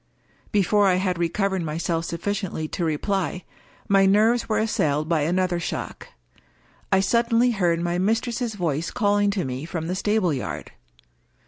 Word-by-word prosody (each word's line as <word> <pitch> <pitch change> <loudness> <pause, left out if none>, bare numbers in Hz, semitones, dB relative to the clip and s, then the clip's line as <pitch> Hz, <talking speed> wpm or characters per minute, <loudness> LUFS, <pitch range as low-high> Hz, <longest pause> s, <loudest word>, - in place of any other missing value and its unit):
Before 205 0 +3
I 185 - +4
had 185 -1 -1
recovered 190 +2 0
myself 165 +1 -2
sufficiently 175 -2 -3
to 175 - -3
reply, 180 +3 -1 0.4
my 195 -1 +4
nerves 220 +5 +3
were 215 - +1
assailed 155 -9 0
by 165 -2 +1
another 175 +3 0
shock. 170 - -5 0.8
I 190 - +5
suddenly 235 +4 +2
heard 175 -6 +1
my 175 +1 -1
mistress's 225 +3 -1
voice 165 -3 -1
calling 205 -1 +2
to 195 -3 -1
me 130 +1 -4
from 165 0 -4
the 175 - -2
stable 200 -3 +1
yard. 130 - -5
185 Hz, 145 wpm, -24 LUFS, 170-205 Hz, 0.8 s, I